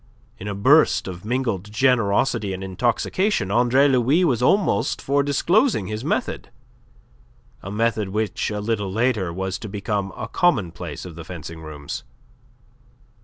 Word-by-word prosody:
In 100 - -7
a 100 - -3
burst 140 +8 +4
of 90 -1 -7
mingled 110 -4 -2
generosity 115 -2 +2
and 95 +1 -6
intoxication, 115 - 0
Andre 125 +5 +4
Louis 135 +7 +3
was 125 -8 +1
almost 195 +10 +2
for 140 +1 +1
disclosing 145 - +2
his 110 +3 -5
method - - -2 1.1
a 100 - -7
method 110 -1 0
which 105 -1 -1
a 105 -1 -3
little 105 -3 -2
later 110 -4 0
was 95 +2 -3
to 110 - -7
become 100 -1 -2
a - - -4
commonplace 90 - -1
of 90 - -8
the 85 +1 -9
fencing 85 -1 -8
rooms. 75 -2 -7
105 Hz, 140 wpm, -22 LUFS, 95-125 Hz, 1.1 s, burst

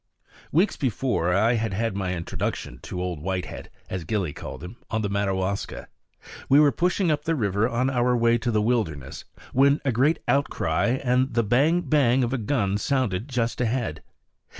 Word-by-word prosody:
Weeks 175 +5 +2
before, 120 - 0
I 110 +6 +3
had 110 -3 -1
had 115 -1 -1
my 95 -2 -2
introduction 85 -1 -4
to 90 - -6
Old 90 -3 -3
Whitehead, 95 +1 -4 0.2
as 95 -2 -4
Gillie 90 -4 -2
called - - -8
him, 90 +7 -9
on 110 -1 -1
the 100 - -1
Madawaska. 100 -1 -2 0.6
We 140 +2 +7
were 150 -1 +6
pushing 180 +1 +1
up 150 - -2
river 110 - +1
on 125 +2 0
our 125 -1 +2
way 115 0 +3
to 120 - -2
the 105 -2 +1
wilderness, 80 - -2 0.3
when 140 +2 +4
a 135 - +2
great 140 +8 +2
outcry 120 - +1
and 125 +1 +2
the 115 - +3
bang 140 +11 +3
bang 135 -5 +3
of 120 +1 -1
a 135 - 0
gun 105 -4 0
sounded 115 -4 0
just 120 -2 -1
ahead. 115 - -1
115 Hz, 175 wpm, -25 LUFS, 95-130 Hz, 0.6 s, We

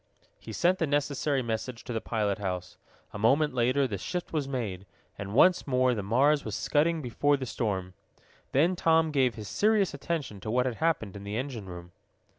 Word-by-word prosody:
He - - -9
sent 180 +2 +2
the 160 - +1
necessary 145 -1 0
message 115 +1 -4
to 120 - -5
the 115 - -2
pilot 105 -3 -1
house. 90 -2 -4 0.4
A 105 - -6
moment 135 +7 +3
later 130 +3 +2
the 100 -5 -4
shift 180 - -4
was 150 -4 -1
made, 105 -8 -4 0.3
and 100 +1 -6
once 180 +5 +5
more 130 -1 +3
the 110 - -2
Mars 135 +9 +3
was 110 -3 -4
scudding 160 +1 +1
before 145 +4 +1
the 130 - -4
storm. 95 -6 -3 0.6
Then 165 +7 +3
Tom 160 -2 +3
gave 130 -4 +2
his 105 -3 -7
serious 210 - +2
attention 140 -7 -4
to 110 - -6
what 125 +3 +2
had 125 -3 -2
happened 155 - 0
in 100 - -8
the 100 +2 -4
engine 125 -6 -4
room. 85 -1 -9
125 Hz, 195 wpm, -28 LUFS, 105-150 Hz, 0.6 s, once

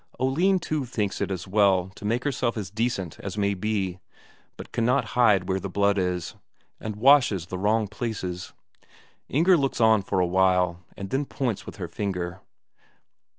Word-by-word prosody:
Oline 170 +10 +2
too 155 -4 -2
thinks 105 -5 -2
it - - 0
as 95 -3 -4
well 95 -2 +3
to 105 - -10
make 115 +4 0
herself 125 -5 -1
as 95 -4 -5
decent 105 -6 -2
as 100 +1 -6
may 100 -1 +1
be, 95 -2 -2 0.6
but - - -10
cannot 125 +4 +1
see 105 -7 +4
where 95 +1 -1
the 100 - -5
blood 100 +1 +2
is, 90 -2 -2 0.5
and 110 -1 -5
washes 115 - +4
the 90 +1 -5
wrong 105 +2 +2
places. 100 -5 -5 0.8
Inger 170 +6 +4
looks 135 -3 -1
on 110 -2 +5
for 95 - -1
a 90 - +3
while, 90 -1 +2 0.2
and 100 -1 -6
then 140 +2 0
points 125 -6 -3
with - - -8
her 90 -3 -5
finger. 90 0 -4
100 Hz, 170 wpm, -25 LUFS, 95-120 Hz, 0.8 s, on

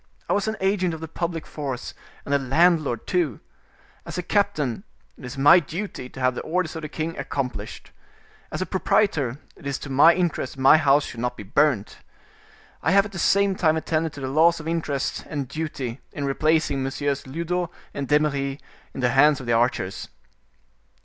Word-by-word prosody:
I - - +1
was 205 +1 0
an 220 -1 -2
agent 190 -3 +1
of - - -9
the 160 - -6
public 165 0 -4
force 135 -5 -5 0.3
and 140 - -2
a 140 - +4
landlord, 145 -2 +2
too. 170 - 0 0.6
As - - -7
a 180 - -2
captain, 195 - 0 0.3
it - - -16
is 125 +3 -7
my 145 +6 +7
duty 170 -4 -6
to 130 - -11
have 130 0 +2
the - - -5
orders 170 0 -2
of 160 - -5
the 155 - -6
king 160 +2 -4
accomplished. 135 -3 -4 0.6
As - - -2
a - - -5
proprietor, 160 - +1 0.2
it 140 - -10
is 140 -1 -1
to 140 - -8
my 160 +5 +6
interest 175 -5 -1
my 135 +3 +7
house 145 -1 +3
should 120 - -8
not 125 +1 -2
be - - -7
burnt. 120 +1 +1 0.8
I - - +1
have 200 +1 +5
at 210 - -8
the 180 - -6
same 200 +1 +3
time 160 -3 +2
attended 160 0 -1
to 140 - -9
the 130 - -3
laws 165 +5 +4
of 155 - -8
interest 160 -4 -2
and 145 -4 -3
duty 140 -4 -5
in 145 - -4
replacing 155 0 +1
Messieurs 135 +1 -2
Lyodot 170 +4 -2 0.2
and 140 -1 -4
D'Eymeris 140 -2 +1 0.4
in - - -4
the 125 - +3
hands 145 +2 +5
of 130 - -8
the 120 - +1
archers." 115 -5 0
150 Hz, 190 wpm, -24 LUFS, 135-170 Hz, 0.8 s, my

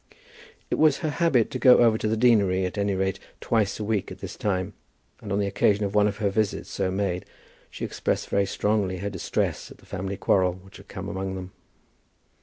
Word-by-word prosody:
It - - 0
was 155 -1 +5
her 155 - 0
habit 150 -8 +2
to 130 - -3
go 125 -1 +7
over 115 -2 +5
to - - -1
the 110 +1 0
deanery 100 -6 +3
at 90 - -4
any 100 -1 0
rate 95 0 -1 0.2
twice 110 -3 0
a - - -2
week 105 -2 -1
at - - -8
this - - -7
time, 95 -1 -2 0.5
and 105 - -7
on 100 - +1
the 100 - +1
occasion 100 +1 +2
of 100 - -4
one 105 0 +4
of 100 -1 -3
the 100 -3 0
visits 105 0 -1
so 95 - -1
made, 95 -2 -1 0.5
she - - -5
expressed - - -2
very 100 -1 +1
strongly 100 -2 0
her 100 +2 -4
distress 95 -4 -2
at - - -13
the - - -21
family 95 0 -4
quarrel 95 -3 +2
which 95 +2 -14
had 100 - -15
come 95 0 -7
among 95 -1 -4
them. 95 0 -7
100 Hz, 215 wpm, -25 LUFS, 95-110 Hz, 0.5 s, go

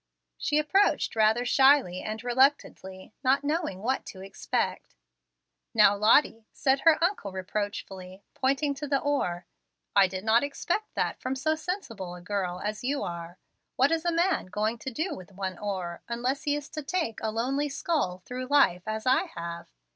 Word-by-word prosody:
She 295 - +1
approached 305 - +2
rather 220 +2 +3
shyly 265 -7 +4
and 220 +1 -5
reluctantly, 245 -7 0
not 270 +2 +3
knowing 290 - -2
what 260 +3 0
to 190 - -9
expect. 195 0 -3 0.8
"Now, 210 -2 +6
Lottie," 220 +1 +3
said 270 -1 +1
her 325 +1 +5
uncle, 345 - 0
reproachfully, 190 -1 -5
pointing 275 +2 +1
to 285 +1 -6
the 280 -1 +2
oar, 180 -12 -1 0.5
"I 200 -1 +6
did 185 0 -6
not 225 +3 +4
expect 345 +9 -3
that - - -1
from 255 +1 -3
so 310 +4 +1
sensible 310 - -5
a - - -10
girl 180 -1 -2
as 210 +2 -4
you 280 +3 -1
are. 170 0 -6 0.4
What 270 +4 +3
is 325 -1 +1
a 345 - +1
man 340 - +1
going 215 +4 -2
to 265 - -5
do 315 +7 -3
with 185 -3 -11
one 190 -1 -5
oar, 185 -4 -4
unless 250 +4 -2
he 290 -1 +2
is 295 0 -5
to 305 - -5
take 300 -6 -2
a 220 - -1
lonely 265 +6 -1
scull 270 - -1
through 255 +1 -5
life 215 -10 +3
as 220 +1 -3
I 255 0 +3
have? 170 0 -6
235 Hz, 170 wpm, -28 LUFS, 195-285 Hz, 0.8 s, Now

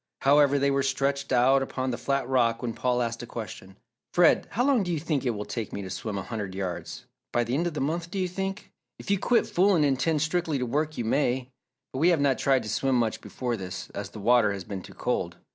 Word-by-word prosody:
However, 145 0 +5
they 140 0 +2
were 140 0 +2
stretched 135 +1 -1
out 130 +2 +4
upon 130 -1 -2
the 120 - -3
flat 140 +1 -1
rock 120 -2 +2
when 120 -2 -2
Paul 125 0 0
asked 115 0 -3
a 120 - -7
question. 95 -4 -8 0.4
"Fred, 175 -1 +5
how 245 +3 0
long 275 -5 +4
do 175 -2 -2
you 165 - 0
think 150 -3 -1
it 120 - 0
will 105 0 -4
take 115 -4 -4
me 100 - -5
to 95 - -7
swim 105 +1 -4
a 95 - -3
hundred 100 -5 -5
yards? 95 -3 -5 0.3
By 120 - +2
the 120 +1 -3
end 165 +6 +1
of 165 - -4
the - - -2
month, 165 +4 -2
do 195 - -5
you 185 -1 +1
think?" 195 +2 -5 0.3
"If - - -5
you 200 - +3
quit 240 +4 +3
fooling 180 -4 +3
and 135 -2 +1
'tend 155 +1 +1
strictly 160 -2 0
to 125 - -1
work 150 +5 -1
you 120 - -2
may. 130 +1 0 0.4
But 130 - -3
we 165 +4 +5
have 170 -3 +3
not 140 -2 +2
tried 135 -3 +2
to 105 - -6
swim 135 +5 +1
much 115 -3 0
before 125 -2 -3
this, 95 -3 -7
as - - -5
the - - -10
water 115 -1 +4
has 100 -2 -5
been 95 0 -6
too - - -13
cold. - - -2
135 Hz, 255 wpm, -27 LUFS, 115-155 Hz, 0.4 s, However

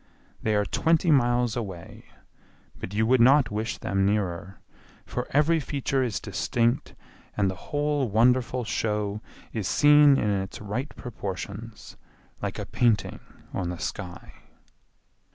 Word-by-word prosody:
They 110 -1 +1
are 105 0 +2
twenty 165 - +2
miles 120 -4 +2
away, 95 -8 -7 0.7
but - - -6
you 110 +2 +1
would 125 +1 +4
not 135 +2 +5
wish 110 +2 -3
them 95 0 -1
nearer, 95 -2 -1 0.5
for 125 - -4
every 155 +3 +3
feature 140 -2 -1
is 120 -6 -1
distinct 115 +5 -1 0.4
and 100 -2 +2
the 95 - -12
whole 145 -3 0
wonderful 125 +3 +2
show 105 -2 -2 0.3
is 105 -4 -2
seen 145 +4 +6
in 105 - +1
its 95 -1 -3
right 115 +8 -4
proportions, 105 0 -7 0.4
like - - -3
a - - -4
painting 120 -4 +1 0.3
on 90 -3 -2
the 90 - -4
sky. 85 +1 -6
115 Hz, 135 wpm, -26 LUFS, 100-130 Hz, 0.7 s, seen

